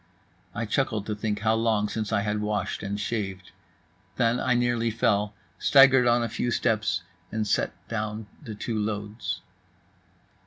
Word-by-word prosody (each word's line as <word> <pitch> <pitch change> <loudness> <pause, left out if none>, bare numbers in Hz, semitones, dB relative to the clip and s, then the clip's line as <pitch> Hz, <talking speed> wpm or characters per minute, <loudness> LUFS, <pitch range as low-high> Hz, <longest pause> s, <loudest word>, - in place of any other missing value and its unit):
I 115 - -1
chuckled 110 -3 0
to 105 - -2
think 105 0 -2
how 110 0 +3
long 110 -2 +2
since 110 0 -3
I 105 -2 +2
had 105 0 -1
washed 105 -2 -2
and 100 0 -3
shaved. 95 -4 -3 0.6
Then 120 +1 +2
I 125 0 +2
nearly 120 -1 +1
fell, 105 -2 +1 0.2
staggered 130 -2 +6
on 120 0 +4
a - - 0
few 120 +2 -2
steps, 110 -6 +1 0.3
and 110 0 -1
set 105 - +1
down 110 -1 -3 0.2
the 115 -8 -7
two 110 +1 -3
loads. 105 +1 -3
110 Hz, 155 wpm, -27 LUFS, 105-115 Hz, 0.6 s, staggered